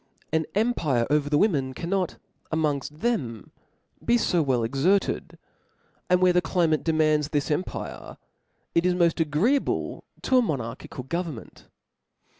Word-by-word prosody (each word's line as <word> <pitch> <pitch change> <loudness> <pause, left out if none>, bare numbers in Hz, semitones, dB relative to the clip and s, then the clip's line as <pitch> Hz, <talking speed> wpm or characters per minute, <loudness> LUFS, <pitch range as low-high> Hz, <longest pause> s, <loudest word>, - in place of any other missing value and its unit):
An 160 0 +2
fira. - - -27
Chap/p. 245 - +1
pire 130 -7 +1
over 150 -1 +2
the 145 - +3
women 140 -10 +1
cannot, 180 +3 -2 0.3
amongft 150 -4 0
them, 125 - -2 0.5
be 240 +1 +3
fo 180 -7 +2
well 130 -5 +1
exerted 140 - +1
j - - -18 0.7
and 180 0 +4
where 180 -1 +5
the 180 - +4
climate 160 -2 +1
demands 155 -2 +2
this 145 0 -1
empire, 165 +5 -4 0.6
it 170 - +3
is 180 0 +2
moft 170 -1 +2
agreeable 165 - 0 0.2
to 260 - +3
a - - +5
monarchical 130 - -4
go 170 +7 -1
vernment. 155 -11 -9
160 Hz, 150 wpm, -26 LUFS, 140-180 Hz, 0.7 s, where